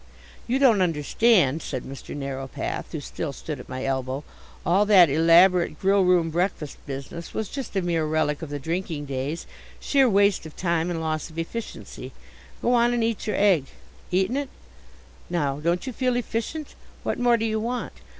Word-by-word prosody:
"You 250 +2 +1
don't 245 -8 +5
understand," 165 - +3
said 130 -4 -4
Mr 135 0 -8
Narrowpath, 135 -2 -4
who - - -3
still - - -5
stood - - -6
at - - -11
my 130 +1 -4
elbow. 130 +1 -2 0.4
"All 190 +4 +4
that 185 -7 +7
elaborate 170 +2 +5
grill 195 0 +3
room 180 -3 +3
breakfast 175 -3 -2
business 140 +5 -7
was 220 -2 -2
just 270 -6 -6
a 190 - +1
mere 165 -3 0
relic 155 -1 0
of 160 - -6
the 145 - -3
drinking 160 0 -3
days 140 +4 -3 0.3
sheer 270 -3 +3
waste 200 -4 +3
of 155 - -14
time 170 -1 0
and 170 -2 -2
loss 155 -1 -2
of 160 - -14
efficiency. 215 +7 -6 0.5
Go 245 - +3
on 240 0 +3
and 235 - +1
eat 225 -1 -1
your 210 - 0
egg. 190 -9 +4 0.4
Eaten 190 +7 +1
it? 285 -1 -2 0.8
Now, 145 -5 -1
don't 170 - 0
you 260 - -4
feel 255 +1 0
efficient? 245 +5 -3 0.3
What - - -2
more 240 -1 +4
do 225 - -1
you 220 -1 0
want? 240 +3 -3
175 Hz, 180 wpm, -25 LUFS, 150-220 Hz, 0.8 s, that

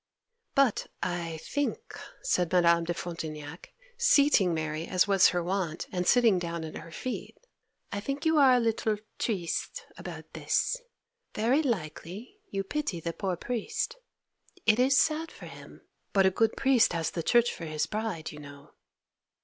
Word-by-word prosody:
'But 275 -6 +3 0.2
I 170 -2 -2
think,' 290 - -3 0.2
said 180 - +1
Madame 170 -2 +4
de 175 - -1
Frontignac, 160 -2 -7 0.3
seating 285 - +5
Mary 160 0 -2
as 185 +2 +2
was 195 -2 +6
her 175 -1 -1
wont, 180 -3 -2
and 180 -1 -2
sitting 230 -6 +5
down 170 -1 -4
at 155 - -7
her - - -11
feet, 255 +9 -5 0.5
'I 200 - -2
think 275 +8 -4
you 320 -1 +4
are 265 -3 +7
a - - +4
little 225 -2 0 0.2
"triste" 220 - -2
about - - -9
this! - - 0 0.5
Very 240 +8 +3
likely 210 - -4
you 195 0 -2
pity 205 - -3
the 165 +1 -4
poor 190 -1 -2
priest! 235 - -3 0.7
It 220 +1 +4
is 265 +2 +4
sad 320 +1 +2
for - - -12
him, - - -12 0.3
but 195 -1 +5
a 190 - +5
good 220 +3 +1
priest 260 -7 +4
has 165 -2 -1
the 170 - -3
church 240 +7 +3
for 165 - -7
his 155 -1 -1
bride, 210 -7 -4
you 150 - -10
know. 145 0 -12
195 Hz, 160 wpm, -29 LUFS, 170-250 Hz, 0.7 s, are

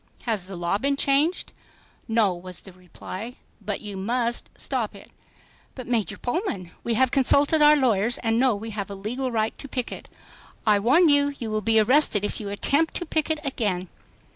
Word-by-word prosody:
"Has 215 -6 -2
the 195 - -7
law 175 +3 -1
been 280 +3 +1
changed?" 285 +6 +1 0.6
"No," 225 -4 +2
was 180 +1 -9
the 190 - -13
reply, 185 +5 -8 0.3
"but 205 0 -3
you 205 -2 -7
must 235 +4 -2
stop - - -3
it." - - -14 0.6
"But, 255 - -7
Major 220 -4 -1
Pullman, 245 - -3
we 235 - 0
have 260 +1 +3
consulted 285 +3 +3
our 300 0 +7
lawyers 235 -4 +2
and 225 0 +1
know 255 -3 +3
we 220 +2 -7
have 205 -2 -4
a 200 - -6
legal 245 +7 -3
right 220 -1 -1
to - - -7
picket." 250 -2 -5 0.6
"I 210 -2 +4
warn 280 - +4
you, 285 -1 +3
you 225 -2 -5
will 215 0 -1
be 225 +2 +3
arrested 220 -3 +3
if - - -3
you 205 -2 -5
attempt 285 +10 +1
to 350 - -2
picket 315 -1 -1
again." 200 -9 -2
230 Hz, 185 wpm, -24 LUFS, 200-275 Hz, 0.6 s, our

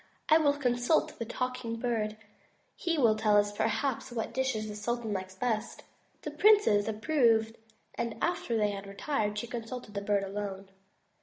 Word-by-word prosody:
"I 315 +1 +7
will 290 -3 +3
consult 245 +2 +1
the 230 - -2
Talking 250 -1 -3
Bird. 225 -3 -2 0.6
He 335 -2 -1
will 230 -6 +4
tell 215 -1 +3
us 205 0 +3
perhaps 225 +5 -1
what 230 -1 -3
dishes 255 -4 -1
the 210 - -6
sultan 225 0 -2
likes 190 -1 -5
best." 225 +1 -2 0.4
The - - -4
princes 405 - +4
approved 225 -1 +2 0.4
and 235 -1 -3
after 295 -9 0
they 210 -1 +1
retired, 210 +1 -2
she 210 - -2
consulted 235 -1 -6
the 200 - -3
Bird 200 -1 +1
alone. 195 -1 -5
225 Hz, 155 wpm, -30 LUFS, 210-250 Hz, 0.6 s, I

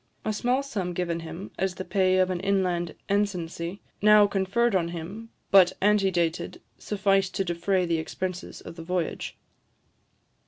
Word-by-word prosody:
A 215 - 0
small 250 +5 +1
sum 195 -10 -3
given 170 -1 -2
him 165 +4 -8
as 190 0 0
the 185 - -6
pay 185 -2 +2
of 185 0 +3
an 180 - -2
inland 185 -3 0
ensigncy, 185 -3 -2 0.2
now 210 0 +7
conferred 200 +4 +1
on 170 -3 +2
him, 175 +7 -7 0.2
but 185 -2 +7
antedated, 190 -5 +1 0.2
sufficed 195 -2 +1
to 195 - +1
defray 180 +2 0
the 165 -1 0
expenses 180 +3 -5
of 165 - -10
the 165 - -7
voyage. 180 -1 -3
185 Hz, 150 wpm, -26 LUFS, 175-200 Hz, 0.2 s, now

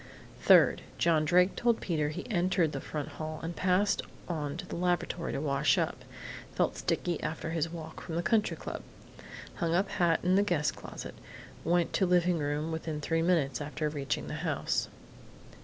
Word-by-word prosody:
"Third: - - +6 0.2
John 160 -2 +3
Drake 180 +4 +4
told 235 -2 +2
Peter 155 -4 0
he 150 - -6
entered 180 -5 +2
the - - -4
front 150 -2 -4
hall 155 0 -6
and 170 +1 -4
passed 185 +2 +2 0.3
on 150 -3 -3
to 180 - -6
the - - -6
lavatory 175 -1 -1
to - - -2
wash 140 -2 +2
up. - - -1 0.5
Felt - - +1
sticky 175 -3 -1
after 160 +1 -3
his 165 -1 0
walk 160 -1 -8
from 165 - -6
the 170 - 0
Country 215 +3 +2
Club. - - -6 0.8
Hung 170 -2 +1
up 190 +3 +2
hat 170 -3 +2
in 185 +2 +4
the - - +5
guest 155 -6 +1
closet. - - -8 0.5
Went 170 +1 +2
to 190 - +2
living 175 -1 +3
room 150 +2 -1
within 160 -1 -3
three 165 +2 0
minutes 155 -7 +1
after 150 +1 -2
reaching 145 -2 -3
the - - -5
house. - - -1
165 Hz, 175 wpm, -30 LUFS, 155-180 Hz, 0.8 s, Third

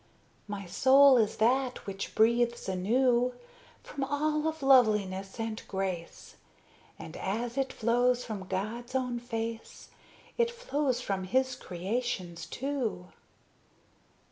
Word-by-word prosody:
My 205 -1 -5
soul 270 +8 +6
is 220 -3 +1
that 255 +3 +1
which 195 0 -6
breathes 235 +2 +2
anew 240 +6 +2 0.5
From 275 - -5
all 300 +2 0
of 315 -2 -4
loveliness 210 -7 +3
and 225 -1 -3
grace; 190 -3 -5 0.6
And 160 - -9
as 230 +5 -3
it 270 -1 -1
flows 245 +2 +1
from 200 -5 -6
God's 225 +7 -4
own 250 -2 -1
face, 230 -1 -6 0.5
It 470 0 +3
flows 295 - -1
from 195 -5 -2
His 260 +5 +1
creations, 185 -4 -4
too. 250 -9 -3
235 Hz, 115 wpm, -30 LUFS, 195-260 Hz, 0.6 s, soul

